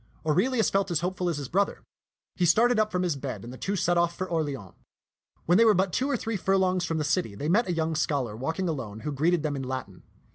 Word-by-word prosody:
Aurelius 220 Hz, -, +2 dB
felt 195 Hz, 0 st, +1 dB
as 170 Hz, -3 st, 0 dB
hopeful 180 Hz, 0 st, -1 dB
as 165 Hz, -, -2 dB
his 140 Hz, -2 st, -5 dB
brother. 200 Hz, +7 st, 0 dB, 0.5 s
He 180 Hz, -, -1 dB
started 225 Hz, +7 st, +4 dB
up 215 Hz, 0 st, +1 dB
from 180 Hz, 0 st, 0 dB
his 175 Hz, -4 st, 0 dB
bed, 130 Hz, -7 st, -6 dB
and 120 Hz, +2 st, -8 dB
the -, -, -9 dB
two 200 Hz, -, -2 dB
set 175 Hz, -2 st, +2 dB
off 170 Hz, 0 st, 0 dB
for 185 Hz, -, -3 dB
Orleans. 145 Hz, -, -3 dB, 0.7 s
When 175 Hz, +4 st, +4 dB
they -, -, +7 dB
were 220 Hz, -2 st, +5 dB
but 185 Hz, 0 st, +1 dB
two 265 Hz, +2 st, 0 dB
or 275 Hz, -, +1 dB
three 225 Hz, -1 st, -3 dB
furlongs 185 Hz, -1 st, +1 dB
from 165 Hz, -1 st, -2 dB
the 155 Hz, -, 0 dB
city, 150 Hz, -, 0 dB
they 145 Hz, -, -4 dB
met 210 Hz, +6 st, +3 dB
a -, -, 0 dB
young 160 Hz, -1 st, -1 dB
scholar 140 Hz, -8 st, -1 dB
walking 160 Hz, +10 st, -2 dB
alone 115 Hz, -9 st, -4 dB
who 150 Hz, -, -3 dB
greeted 160 Hz, +4 st, +1 dB
them 150 Hz, -2 st, -1 dB
in 135 Hz, -, -3 dB
Latin. 130 Hz, -8 st, -5 dB
170 Hz, 250 wpm, -27 LUFS, 145-190 Hz, 0.7 s, they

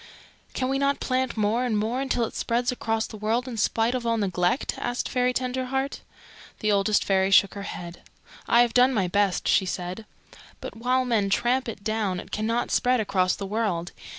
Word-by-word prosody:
"Can 255 Hz, -, 0 dB
we 270 Hz, +1 st, 0 dB
not 280 Hz, 0 st, +1 dB
plant 255 Hz, -2 st, -1 dB
more 215 Hz, +3 st, +1 dB
and 235 Hz, -4 st, 0 dB
more 225 Hz, +5 st, -1 dB
until 255 Hz, -3 st, 0 dB
it -, -, -8 dB
spreads 240 Hz, +2 st, 0 dB
across 225 Hz, -2 st, -1 dB
the 215 Hz, -, -9 dB
world 225 Hz, +4 st, -1 dB
in 250 Hz, -, -5 dB
spite 225 Hz, +2 st, +1 dB
of 255 Hz, -2 st, -2 dB
all 230 Hz, -1 st, +1 dB
neglect?" 185 Hz, +2 st, 0 dB
asked 245 Hz, 0 st, -2 dB
Fairy 250 Hz, -1 st, +1 dB
Tenderheart. 260 Hz, +2 st, -2 dB, 0.6 s
The 215 Hz, -, +1 dB
Oldest 200 Hz, +1 st, +2 dB
Fairy 190 Hz, -1 st, +2 dB
shook 195 Hz, 0 st, +5 dB
her 200 Hz, -, -6 dB
head. 170 Hz, 0 st, -8 dB, 0.5 s
"I 235 Hz, -, +5 dB
have 235 Hz, -2 st, -2 dB
done 250 Hz, +1 st, +4 dB
my 190 Hz, -4 st, +1 dB
best," 200 Hz, 0 st, +1 dB
she 190 Hz, -, +3 dB
said; 180 Hz, +4 st, -5 dB, 0.5 s
"but -, -, -8 dB
while 255 Hz, +3 st, +1 dB
men 220 Hz, -5 st, +1 dB
tramp 245 Hz, +5 st, +1 dB
it 200 Hz, -3 st, -8 dB
down 215 Hz, -4 st, -1 dB
it -, -, -11 dB
cannot 230 Hz, +3 st, -1 dB
spread 250 Hz, 0 st, +2 dB
across 185 Hz, -3 st, +1 dB
the 200 Hz, -, -6 dB
world. 195 Hz, -5 st, -2 dB
225 Hz, 195 wpm, -25 LUFS, 200-250 Hz, 0.6 s, shook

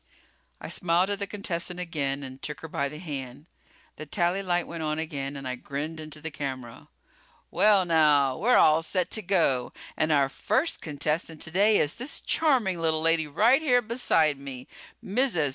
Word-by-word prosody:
I -, -, -8 dB
smiled 180 Hz, +2 st, +1 dB
at 200 Hz, -, -2 dB
the 200 Hz, -, -3 dB
contestant 180 Hz, -3 st, -3 dB
again 145 Hz, -6 st, -3 dB
and 130 Hz, 0 st, -10 dB
took 150 Hz, -, -6 dB
her 160 Hz, -, -7 dB
by 140 Hz, -2 st, -2 dB
the 150 Hz, -, -9 dB
hand. 140 Hz, -4 st, -7 dB, 0.5 s
The 155 Hz, -, -8 dB
tally 175 Hz, +4 st, 0 dB
light 175 Hz, -2 st, 0 dB
went 170 Hz, -1 st, -7 dB
on 155 Hz, 0 st, -2 dB
again 145 Hz, -3 st, -4 dB
and 135 Hz, -1 st, -6 dB
I 130 Hz, -, -2 dB
grinned 145 Hz, +5 st, -5 dB
into 155 Hz, -1 st, -8 dB
the 160 Hz, +1 st, -6 dB
camera. 130 Hz, -5 st, -6 dB, 0.6 s
"Well, 200 Hz, 0 st, +4 dB
now, 150 Hz, -5 st, +4 dB
we're 250 Hz, +3 st, +4 dB
all 155 Hz, +1 st, +5 dB
set 180 Hz, +2 st, -2 dB
to 215 Hz, -, +1 dB
go... 165 Hz, -10 st, +1 dB, 0.2 s
and 155 Hz, 0 st, 0 dB
our 140 Hz, -2 st, +3 dB
first 215 Hz, -, -1 dB
contestant 155 Hz, +1 st, -2 dB
today 200 Hz, +6 st, +3 dB
is 150 Hz, -, +1 dB
this 255 Hz, +5 st, -4 dB
charming 245 Hz, -, +1 dB
little 160 Hz, -1 st, +1 dB
lady 165 Hz, -1 st, +3 dB
right 220 Hz, -, +3 dB
here 250 Hz, -6 st, +3 dB
beside 165 Hz, -, +2 dB
me. 130 Hz, -2 st, -8 dB, 0.4 s
Mrs. 200 Hz, -, +1 dB
160 Hz, 180 wpm, -26 LUFS, 145-190 Hz, 0.6 s, all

